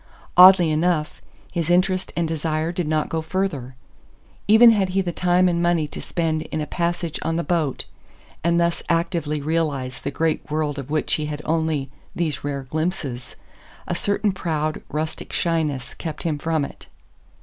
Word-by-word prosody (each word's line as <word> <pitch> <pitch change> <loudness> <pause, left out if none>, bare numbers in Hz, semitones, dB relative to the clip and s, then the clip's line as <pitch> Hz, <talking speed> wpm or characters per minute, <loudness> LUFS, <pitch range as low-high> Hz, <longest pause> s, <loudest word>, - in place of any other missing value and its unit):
Oddly 180 -2 +8
enough, 155 0 0 0.3
his 170 -2 -2
interest 185 +1 +2
and 170 -1 +1
desire 160 0 -1
did 175 -2 -2
not 155 0 +1
go 160 - -2
further. 155 -7 -3 0.7
Even 225 +3 +8
had 200 -4 +2
he - - +4
the 180 -2 -2
time 180 +1 +3
and 170 -1 +1
money 175 -3 +2
to - - -6
spend 160 -3 -1
in 155 - -4
a 150 - -1
passage 170 +1 -2
on 165 - -1
the 170 - 0
boat, 160 -7 -1 0.6
and 170 +1 +3
thus 170 0 +1
actively 165 -3 0
realize 145 -5 -1
the 140 - -2
great 160 +3 -1
world 150 -1 -1
of 135 0 -7
which 155 0 0
he 150 -1 0
had 150 0 -5
only 160 -4 0 0.2
these 165 -4 -2
rare 140 -1 -3
glimpses, 135 -4 -3 0.5
a - - -1
certain 200 +3 0
proud, 155 -4 -2
rustic 155 +1 -4
shyness 155 -6 -1
kept 160 -3 -6
him 155 -3 -1
from 160 -2 0
it. - - -12
160 Hz, 170 wpm, -23 LUFS, 150-175 Hz, 0.7 s, Oddly